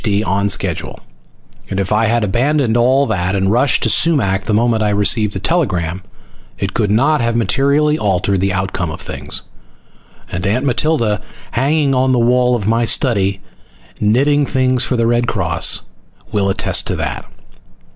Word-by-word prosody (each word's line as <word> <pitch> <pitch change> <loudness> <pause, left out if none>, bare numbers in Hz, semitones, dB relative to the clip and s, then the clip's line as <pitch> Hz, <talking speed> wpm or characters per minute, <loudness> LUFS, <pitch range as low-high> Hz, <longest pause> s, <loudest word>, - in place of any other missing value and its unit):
D. 105 -2 0
on 100 +1 0
schedule, 95 -4 -2 0.7
and 100 - -3
if 95 0 -2
I 110 +2 +2
had 115 0 +1
abandoned 120 +4 +1
all 130 +4 +3
that 90 -4 -1
and 95 0 +1
rushed 125 +4 +2
to - - +2
Sumac 100 - +2
the 115 - -2
moment 115 0 +1
I 105 - +1
received 105 +1 +1
the 95 - -4
telegram 95 - -1 0.6
it 100 0 -3
could 105 -3 0
not 140 +8 +2
have 115 0 0
materially 140 +7 +1
altered 95 -1 0
the 95 0 +1
outcome 95 -2 -2
of 75 - -7
things. - - -6 0.9
And 90 +2 -3
Aunt 125 +7 0
Matilda, 125 -5 0 0.3
hanging 140 +2 +1
on 130 0 +2
the - - +2
wall 125 +1 +2
of 105 -4 -3
my 115 +2 +2
study, 100 -6 +1 0.6
knitting 140 +7 +2
things 130 -2 +1
for 130 - -1
the 115 - +1
Red 120 +1 +1
Cross, 90 -6 0 0.5
will 100 -2 0
attest 95 - 0
to - - -1
that. - - -4
115 Hz, 165 wpm, -16 LUFS, 100-130 Hz, 0.9 s, all